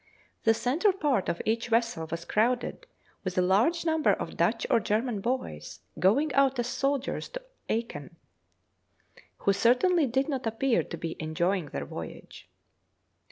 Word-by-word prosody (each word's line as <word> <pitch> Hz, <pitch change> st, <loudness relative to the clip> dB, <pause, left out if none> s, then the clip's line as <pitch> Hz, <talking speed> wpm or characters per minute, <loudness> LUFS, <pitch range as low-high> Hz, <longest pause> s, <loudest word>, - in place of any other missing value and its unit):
The 225 Hz, 0 st, +5 dB
centre 310 Hz, -, +2 dB
part 285 Hz, -, 0 dB
of 170 Hz, -, -2 dB
each 230 Hz, +2 st, 0 dB
vessel 230 Hz, -8 st, 0 dB
was 165 Hz, 0 st, -5 dB
crowded 245 Hz, -, 0 dB, 0.4 s
with 185 Hz, -2 st, -4 dB
a -, -, +5 dB
large 230 Hz, -, +2 dB
number 320 Hz, -1 st, +3 dB
of -, -, -5 dB
Dutch -, -, +1 dB
or 230 Hz, -, +4 dB
German 220 Hz, +1 st, -1 dB
boys, 95 Hz, -, -4 dB, 0.2 s
going 275 Hz, +10 st, +3 dB
out 270 Hz, -1 st, +3 dB
as 240 Hz, -, 0 dB
soldiers 275 Hz, +2 st, -1 dB
to -, -, -7 dB, 0.3 s
Acheen, 170 Hz, -, -3 dB, 1.2 s
who 200 Hz, -, +2 dB
certainly 260 Hz, -, +3 dB
did 265 Hz, +3 st, 0 dB
not 265 Hz, -5 st, -2 dB
appear 230 Hz, +2 st, +1 dB
to -, -, -7 dB
be 165 Hz, -1 st, -4 dB
enjoying 170 Hz, +2 st, 0 dB
their -, -, -5 dB
voyage. -, -, -9 dB
235 Hz, 150 wpm, -28 LUFS, 195-275 Hz, 1.2 s, The